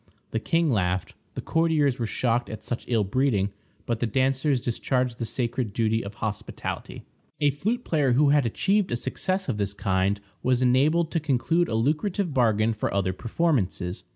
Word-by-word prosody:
The 115 - 0
king 165 +5 +1
laughed; 95 -4 0 0.2
the - - -5
courtiers 155 -5 +2
were 115 - -1
shocked 120 +1 0
at 110 -1 -7
such 120 - -4
ill 115 -4 +2
breeding, 100 -2 +1 0.3
but 115 -2 -1
the 120 - 0
dancers 130 +3 +1
discharged 125 +1 -1
the 115 - -1
sacred 120 -2 -2
duty 110 +1 +1
of 100 +1 -8
hospitality. 105 -2 -5 0.4
A 145 -1 +3
flute 215 - -2
player 145 -6 +2
who 140 +3 +4
had 145 0 +4
achieved 195 - +1
a - - +1
success 185 +10 -2
of 125 -6 -1
this 100 -1 -2
kind 95 0 +1 0.2
was 130 0 +2
enabled 150 +7 +3
to 165 - +1
conclude 155 +4 +1
a 110 - -2
lucrative 155 - 0
bargain 115 -3 +3
for 110 - -2
other 95 -2 0
performances. 110 - -1
125 Hz, 175 wpm, -26 LUFS, 110-150 Hz, 0.4 s, who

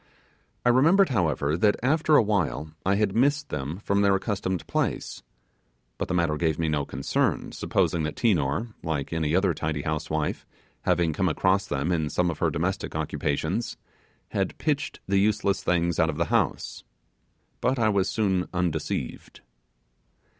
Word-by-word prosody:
I - - +5
remembered, 165 +10 +5
however, 80 - +1
that 105 +4 +3
after 155 +3 +3
awhile 80 - +1
I 95 +1 +2
had 100 -1 0
missed 145 +4 +2
them 75 +3 -4
from 100 0 0
their 100 -1 +4
accustomed 95 -3 -2
place; - - -2 0.8
but - - -2
the 90 - -1
matter 85 -3 +1
gave 80 -1 0
me 80 -1 0
no 75 -2 0
concern, 70 +1 -1
supposing 85 - 0
that 75 0 -3
Tinor 100 - +1
like 80 -2 -3
any 80 -1 0
other 95 -1 +3
tidy 75 -1 -3
housewife, 80 -1 -2 0.4
having 85 -2 +2
come 95 +3 +1
across 95 +5 +1
them 75 +4 -1
in 80 -4 0
some 90 +2 +1
of 80 - -8
her - - +2
domestic - - -2
occupations 85 +11 -2 0.5
had - - -2
pitched - - -1
the 95 0 +3
useless 100 -1 +1
things 85 -1 +1
out 80 - +3
of 75 - -3
the 85 - +1
house. - - 0 0.8
But 130 +1 +1
I 110 -2 +3
was 100 -2 +1
soon 95 -5 0
undeceived. 90 -3 -3
90 Hz, 155 wpm, -26 LUFS, 80-105 Hz, 0.8 s, I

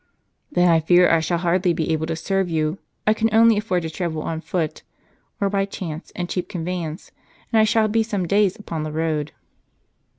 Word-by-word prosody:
" - - -48
Then 180 -10 +3
1 165 -2 +4
fear 175 +2 +5
I 165 - +5
shall 170 +2 0
hardly 175 +1 +1
be 165 -1 -1
able 160 0 -1
to 165 - -2
serve 190 +3 -1
you. 155 +2 -1 0.3
I 215 - +5
can 225 +1 +1
only 225 +1 +6
afford 195 -4 -1
to 160 - -3
travel 160 -2 -3
on 160 -1 -3
foot, 165 -3 -3 0.6
or 200 - +1
by 195 0 0
chance 170 -4 -7
and 175 -1 -3
cheap 180 0 -3
convey 180 -2 -3
ance, 160 +1 -7 0.4
and 225 - +5
I 215 - +6
shall 220 0 +3
be 225 +2 +2
some 205 -5 -2
days 200 0 +3
upon 165 -7 -5
the 155 0 -4
road." 155 -1 -1
175 Hz, 210 wpm, -22 LUFS, 160-200 Hz, 0.6 s, only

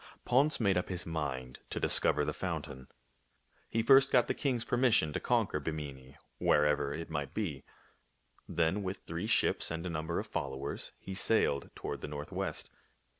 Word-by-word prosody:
Ponce 140 +4 +3
made 100 -5 +3
up 90 - -1
his 90 -2 -4
mind 65 -6 -4
to - - -3
discover - - +4
tlie - - -2
foun - - -3
tain. 65 0 -10 0.8
He 115 - 0
first 135 +3 +7
got 125 - +5
the - - +1
king's 125 -5 -1
permission 120 - +3
to - - -1
conquer - - +1
Bimini, 70 -4 -6 0.2
wherever 75 -1 +3
it 80 +2 -5
might 75 +2 -3
be. 80 -11 -2 0.9
Then 85 +4 +1
with 95 0 -4
three 85 +6 -3
ships 110 - +2
and 85 +2 -4
a 90 - -2
number 80 +1 -2
of 105 - -2
followers 70 -8 -4
he 95 - -8
sailed 95 -8 +1
toward - - -5
the - - -4
northwest. 75 0 -4
80 Hz, 170 wpm, -32 LUFS, 75-105 Hz, 0.9 s, first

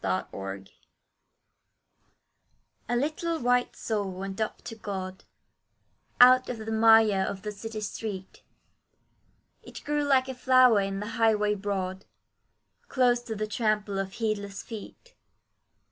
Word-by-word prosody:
A - - 0
BABY'S 95 0 -6
DEATH - - -22 2.2
A 240 - +1
little 310 +6 -1
white 245 -2 +1
soul 210 -3 -2
went 195 +2 -6
up 215 - -3
to - - -7
God, 190 -3 -6 0.9
Out 255 +1 +7
of 250 - -3
the 220 0 -6
mire 220 -2 +5
of 190 0 -4
the 210 - -4
city 215 +1 -7
street; 205 -2 -6 1.2
It - - -11
grew 295 0 0
like 265 -2 +3
a 265 - -4
flower 255 -3 +5
in 195 0 -3
the - - -4 0.2
highway 210 -2 +3
broad, 195 -2 -4 0.8
Close 245 -2 +2
to 225 -2 -6
the 215 +1 -2
trample 210 -2 -1
of 195 0 -4
heedless 205 -3 -3
feet. 230 - -10
215 Hz, 130 wpm, -27 LUFS, 195-245 Hz, 2.2 s, Out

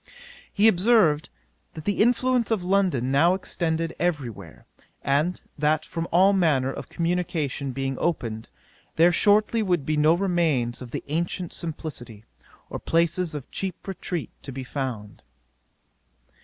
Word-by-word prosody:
'He 210 +1 +4
observed, 185 -7 +3 0.5
that 155 - -8
the 205 0 +1
influence 245 +1 +2
of 220 -5 0
London 180 -10 +1
now 165 +7 +4
extended 165 -3 -2
every 150 -9 0
where, 105 - -13 0.4
and 150 +6 +1 0.2
that 150 +1 +1
from 165 0 -4
all 190 +4 +5
manner 145 -8 +2
of - - -8
communication 165 -5 -2
being 135 0 -3
opened, 115 -10 -2 0.5
there 170 +2 +5
shortly 210 +4 +3
would 175 -8 0
be 155 0 0
no 155 +2 +5
remains 165 -11 0
of 125 - -8
the - - -5
ancient 170 +3 -2
simplicity, 135 - -6 0.4
or - - -6
places 170 0 +1
of 145 - -7
cheap 190 -1 -5
retreat 180 -4 -4
to 140 - -7
be 130 0 -6
found. 125 -6 -5
165 Hz, 140 wpm, -25 LUFS, 140-180 Hz, 0.5 s, all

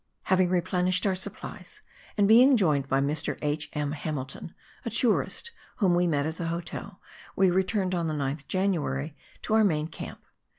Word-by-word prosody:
Having 185 -1 +3
replenished 180 +1 +1
our 195 - +2
supplies, 185 - -6 0.4
and 205 -1 +4
being 250 +5 +7
joined 150 -9 +2
by 135 0 +2
Mr. 145 +3 -1
H. 150 0 -1
M. 150 -1 -2
Hamilton, 145 -3 -5 0.3
a - - -3
tourist 470 - 0 0.2
whom 190 -5 +2
we 175 0 +3
met 145 -3 +1
at 160 +1 -3
the 170 - -3
hotel, 175 +3 -5 0.4
we 190 -1 +4
returned 190 +1 0
on 170 -2 0
the 155 - -2
9th 140 0 -3
January 160 -6 -1 0.3
to - - -2
our 220 0 +5
main 155 -6 +1
camp. 165 - -9
175 Hz, 170 wpm, -27 LUFS, 150-190 Hz, 0.4 s, being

